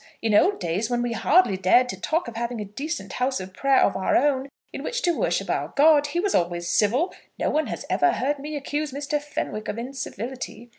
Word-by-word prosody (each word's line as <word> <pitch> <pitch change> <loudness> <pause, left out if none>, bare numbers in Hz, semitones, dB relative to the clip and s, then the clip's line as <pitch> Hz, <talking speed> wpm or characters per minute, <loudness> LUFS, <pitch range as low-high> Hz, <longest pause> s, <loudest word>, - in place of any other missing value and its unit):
In 225 -1 0
old 380 - +4
days 185 +5 -1
when 240 -1 0
we 240 - -1
hardly 300 - +3
dared 190 +7 +4
to 190 -5 -6
talk 325 -1 0
of 235 - -7
having 235 0 -3
a 210 - -4
decent 210 - -5
house 255 -1 0
of 185 0 -8
prayer 275 +5 +3
of - - +2
our 190 - +1
own 275 0 +2 0.2
in - - -5
which - - -3
to 350 - +3
worship - - 0
our - - -2
God, 295 0 +5
he 340 +4 -2
was 395 +2 0
always 175 0 0
civil. 230 - +2 0.2
No - - 0
one 310 +1 +1
has - - -5
ever 355 0 +2
heard 285 +2 -1
me 300 +2 -6
accuse 290 +1 -3
Mr. 290 +2 -2
Fenwick 260 -7 -4
of - - -3
incivility. 245 -1 -6
260 Hz, 225 wpm, -24 LUFS, 215-295 Hz, 0.2 s, God